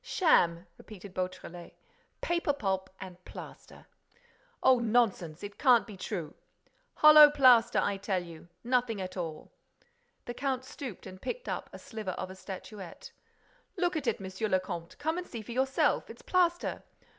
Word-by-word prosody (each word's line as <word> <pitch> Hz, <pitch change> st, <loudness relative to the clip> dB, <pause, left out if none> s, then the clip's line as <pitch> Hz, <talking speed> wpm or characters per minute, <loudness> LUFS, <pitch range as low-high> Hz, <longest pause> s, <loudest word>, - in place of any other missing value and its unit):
"Sham!" 175 Hz, -, +2 dB
repeated 200 Hz, -2 st, -12 dB
Beautrelet. 180 Hz, -2 st, -6 dB, 0.5 s
"Paper 340 Hz, -4 st, 0 dB
pulp 190 Hz, -7 st, -2 dB
and 180 Hz, -1 st, -10 dB
plaster!" -, -, -11 dB, 0.8 s
"Oh, 260 Hz, -1 st, +6 dB
nonsense! 215 Hz, -9 st, 0 dB
It 205 Hz, 0 st, -8 dB
can't 250 Hz, -5 st, +5 dB
be 210 Hz, -, -10 dB
true!" 180 Hz, -5 st, -5 dB, 0.6 s
"Hollow 305 Hz, -1 st, +9 dB
plaster, 255 Hz, -5 st, +5 dB
I 200 Hz, -1 st, +1 dB
tell 195 Hz, -2 st, -2 dB
you! 170 Hz, -1 st, -12 dB, 0.2 s
Nothing 240 Hz, -3 st, 0 dB
at 185 Hz, -1 st, -5 dB
all!" 165 Hz, -4 st, -6 dB, 0.7 s
The 240 Hz, -, -5 dB
count 260 Hz, 0 st, -2 dB
stooped 260 Hz, -6 st, -8 dB
and 185 Hz, 0 st, -10 dB
picked 475 Hz, -, -5 dB
up -, -, -4 dB
a -, -, -9 dB
sliver 215 Hz, -5 st, -6 dB
of 185 Hz, 0 st, -5 dB
a -, -, -10 dB
statuette. 190 Hz, -1 st, -9 dB, 0.7 s
"Look 355 Hz, -1 st, 0 dB
at 295 Hz, -5 st, -3 dB
it, 230 Hz, -, 0 dB
Monsieur 190 Hz, +2 st, -4 dB
le 185 Hz, -2 st, +2 dB
Comte, 175 Hz, -2 st, -7 dB
and 345 Hz, +3 st, -1 dB
see 230 Hz, -3 st, -7 dB
for 225 Hz, -, -9 dB
yourself: 265 Hz, +2 st, +1 dB
it's -, -, -12 dB
plaster! 350 Hz, -1 st, +1 dB
210 Hz, 155 wpm, -30 LUFS, 185-260 Hz, 0.8 s, Hollow